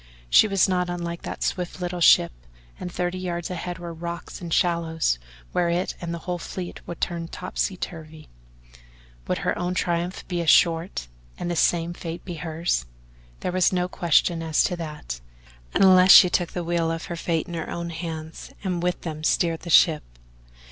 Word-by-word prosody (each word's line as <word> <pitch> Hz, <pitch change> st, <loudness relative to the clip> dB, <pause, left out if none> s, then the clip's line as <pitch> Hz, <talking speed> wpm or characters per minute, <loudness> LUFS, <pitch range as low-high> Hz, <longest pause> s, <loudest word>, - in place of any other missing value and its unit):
She -, -, +7 dB
was 195 Hz, -2 st, +3 dB
not 180 Hz, -1 st, 0 dB
unlike 170 Hz, -1 st, -4 dB
that -, -, -5 dB
swift 180 Hz, 0 st, -2 dB
little 180 Hz, 0 st, -3 dB
ship 85 Hz, -, +6 dB, 0.5 s
and 180 Hz, -, -5 dB
thirty 180 Hz, +1 st, -2 dB
yards 175 Hz, -1 st, -3 dB
ahead 175 Hz, 0 st, -4 dB
were 170 Hz, -1 st, -7 dB
rocks 170 Hz, +1 st, -7 dB
and 170 Hz, -2 st, -6 dB
shallows 165 Hz, -, +1 dB, 0.3 s
where 175 Hz, -1 st, +1 dB
it 175 Hz, +2 st, 0 dB
and 170 Hz, -1 st, -4 dB
the 170 Hz, -, -3 dB
whole 180 Hz, -1 st, -2 dB
fleet 180 Hz, +1 st, -6 dB
would 170 Hz, -, -6 dB
turn 170 Hz, -1 st, -2 dB
topsy 185 Hz, +2 st, -3 dB
turvy 160 Hz, -2 st, -8 dB, 1.0 s
would -, -, 0 dB
her -, -, +1 dB
own 180 Hz, +1 st, -2 dB
triumph 175 Hz, 0 st, -2 dB
be 175 Hz, -2 st, -2 dB
as 165 Hz, -, +1 dB
short 165 Hz, -, +3 dB, 0.3 s
and 175 Hz, -, -3 dB
the -, -, -1 dB
same 170 Hz, +1 st, +2 dB
fate 170 Hz, -1 st, -7 dB
be 180 Hz, -, -5 dB
hers? 160 Hz, -, -2 dB, 0.5 s
There -, -, -1 dB
was 185 Hz, -1 st, +3 dB
no 180 Hz, -1 st, 0 dB
question 170 Hz, -1 st, +2 dB
as 160 Hz, -2 st, +2 dB
to 180 Hz, -, 0 dB
that, 150 Hz, -, -6 dB, 0.5 s
unless 185 Hz, -1 st, +6 dB
she 180 Hz, -, +9 dB
took 175 Hz, -1 st, 0 dB
the 175 Hz, -, -3 dB
wheel 170 Hz, -1 st, 0 dB
of 165 Hz, 0 st, -3 dB
her 170 Hz, -, -5 dB
fate 165 Hz, -1 st, -1 dB
in 175 Hz, -, -8 dB
her 165 Hz, -2 st, -4 dB
own 170 Hz, 0 st, -4 dB
hands 160 Hz, -1 st, -6 dB
and 180 Hz, -3 st, -1 dB
with 180 Hz, +1 st, -1 dB
them 155 Hz, -2 st, -6 dB
steered 165 Hz, 0 st, +1 dB
the 175 Hz, -, -9 dB
ship. 155 Hz, -1 st, +6 dB
170 Hz, 185 wpm, -24 LUFS, 165-180 Hz, 1.0 s, she